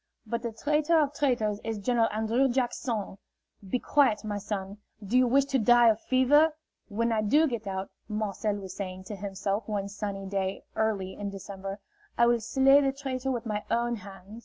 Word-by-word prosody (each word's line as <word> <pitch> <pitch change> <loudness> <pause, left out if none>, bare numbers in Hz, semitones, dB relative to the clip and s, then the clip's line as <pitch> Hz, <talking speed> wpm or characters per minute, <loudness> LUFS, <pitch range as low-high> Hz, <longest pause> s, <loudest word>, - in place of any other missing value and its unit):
But 235 +1 -3
the 235 - -3
traitor 300 +7 +2
of 295 -2 +1
traitors 240 -8 0
is 225 -1 -3
General 230 +2 +1
An 220 +1 -2
drrew 250 +5 +2
Jack 250 -1 0
son. 210 -5 -4 0.5
Be 250 - +1
quiet, 250 -6 +2
my 205 -1 -3
son. 200 0 -5 0.3
Do 210 +5 -2
you 255 0 +5
wish 275 +3 +4
to 275 -1 0
die 240 +1 +6
of 220 0 +1
fever?" 290 +5 +4 0.4
"When 230 +2 -1
I 220 -1 +1
do 295 +10 +4
get 235 -6 -4
out," 190 0 -4 0.2
Marcel 210 0 -2
was 195 -2 -7
saying 185 -1 -6
to 210 +2 -7
himself 200 +1 -3
one 200 -2 -2
sunny 200 -1 -5
day 195 0 -2
early 200 -4 -1
in 205 -1 -5
December, 195 0 -7 0.4
"I 235 - +5
will 240 0 +3
slay 270 +5 +5
the 275 -1 +2
traitor 265 -1 -4
with 245 -3 -2
my 210 -2 -2
own 235 0 0
hand." 200 +2 -11
220 Hz, 195 wpm, -28 LUFS, 200-255 Hz, 0.5 s, die